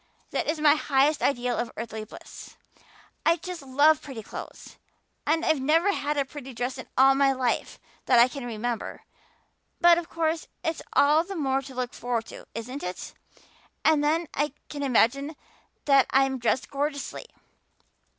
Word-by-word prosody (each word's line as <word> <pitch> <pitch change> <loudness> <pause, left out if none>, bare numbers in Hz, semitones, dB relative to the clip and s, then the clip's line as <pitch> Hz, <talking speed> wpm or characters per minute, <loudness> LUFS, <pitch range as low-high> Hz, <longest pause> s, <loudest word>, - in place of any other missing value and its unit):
That - - -1
is 310 +1 -1
my 300 -1 +6
highest 290 0 +2
ideal 245 -3 +1
of 240 - -2
earthly 220 -1 -5
bliss. - - -12 0.7
I 330 - +4
just 350 0 -7
love 285 +3 +4
pretty 260 -6 -8
clothes. - - -9 0.5
And 320 +2 +2
I've 315 -4 +2
never 325 +8 +3
had 295 -3 -2
a 280 - +1
pretty 270 -2 -9
dress 250 +2 -3
in - - -8
my 270 +1 +5
life 255 -2 -1 0.3
that 250 - +5
I 235 +1 +8
can 270 +1 -7
remember 235 0 -4 0.8
but 345 -1 +6
of 340 - -8
course 325 -1 -1 0.2
it's 325 0 -2
all 300 +3 +5
the 390 +2 -7
more 270 -4 0
to 270 -1 -11
look 250 -1 -3
forward 235 -1 -2
to, - - -11
isn't 250 +5 -5
it? 180 +1 -6 0.7
And 310 -2 +4
then 320 +3 +2
I 295 0 -1 0.2
can 290 - -6
imagine 275 +3 +2 0.5
that 275 -2 +5
I'm 270 -1 +2
dressed 240 +4 0
gorgeously. 285 0 -3
275 Hz, 160 wpm, -26 LUFS, 250-305 Hz, 0.8 s, I